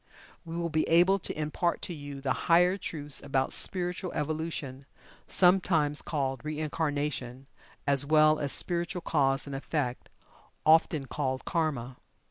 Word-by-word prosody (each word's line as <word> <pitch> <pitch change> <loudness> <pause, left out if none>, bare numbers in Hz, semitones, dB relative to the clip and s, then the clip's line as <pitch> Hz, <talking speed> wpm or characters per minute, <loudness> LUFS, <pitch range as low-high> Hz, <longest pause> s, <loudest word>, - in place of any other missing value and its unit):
We 165 0 -7
will 170 -1 -2
be 155 0 +2
able 180 +4 +5
to 160 - -5
impart 160 +3 -1
to 175 - -3
you 145 -3 -8
the 135 -2 0 0.2
higher 180 +2 +5
truths 150 -7 -3
about 135 -1 0
Spiritual 180 0 0
Evolution, 150 -3 -4 0.4
sometimes 175 -5 +3
called 135 -4 -3
"Reincarnation," 150 -4 -3 0.4
as 140 -1 +3
well 155 +1 +4
as 140 -2 -2
Spiritual 175 +1 +1
Cause 135 -4 +1
and 140 -1 -6
Effect, 135 -2 -3 0.6
often 155 -2 +4
called 130 -1 -3
"Karma." 140 -8 -2
150 Hz, 130 wpm, -29 LUFS, 140-170 Hz, 0.6 s, able